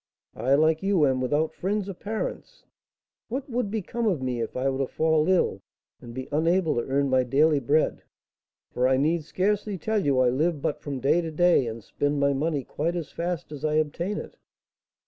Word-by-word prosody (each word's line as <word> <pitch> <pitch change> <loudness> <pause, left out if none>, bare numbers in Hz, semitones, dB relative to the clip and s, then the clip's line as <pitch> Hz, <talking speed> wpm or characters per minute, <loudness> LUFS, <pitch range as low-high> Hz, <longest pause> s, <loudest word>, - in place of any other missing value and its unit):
I, 135 +3 +2
like 155 +2 +3
you, 195 -5 +3
am 130 -2 +1
without 145 +5 0
friends 200 +1 -2
or 195 - -4
parents; 210 +4 -5 0.6
what 260 +4 -4
would 245 -5 -2
become 220 +2 -2
of 180 -8 +1
me 125 -2 -2
if 115 - -4
I 130 +1 0
were 135 0 -1
to 135 - 0
fall 160 +2 +1
ill 175 - +2 0.4
and 120 - -10
be 130 +2 -6
unable 165 +2 +2
to - - +2
earn 140 +1 +2
my 130 -1 +3
daily 145 +4 +3
bread, 145 +4 +1 0.7
for 125 +1 +1
I 130 0 +3
need 155 +4 +1
scarcely 205 +3 -1
tell 220 +3 -1
you 140 -3 +2
I 125 -1 +4
live 155 +5 0
but 140 - -2
from 140 -3 -5
day 155 +6 +3
to 165 - -4
day, 165 -5 +3
and 115 -1 -6
spend 145 +5 -1
my 140 0 +3
money 145 0 -1
quite 165 +7 -2
as 165 -4 -4
fast 170 -3 -4
as 150 -1 -8
I 155 0 +1
obtain 170 +6 -1
it?" - - -8
155 Hz, 205 wpm, -26 LUFS, 135-180 Hz, 0.7 s, I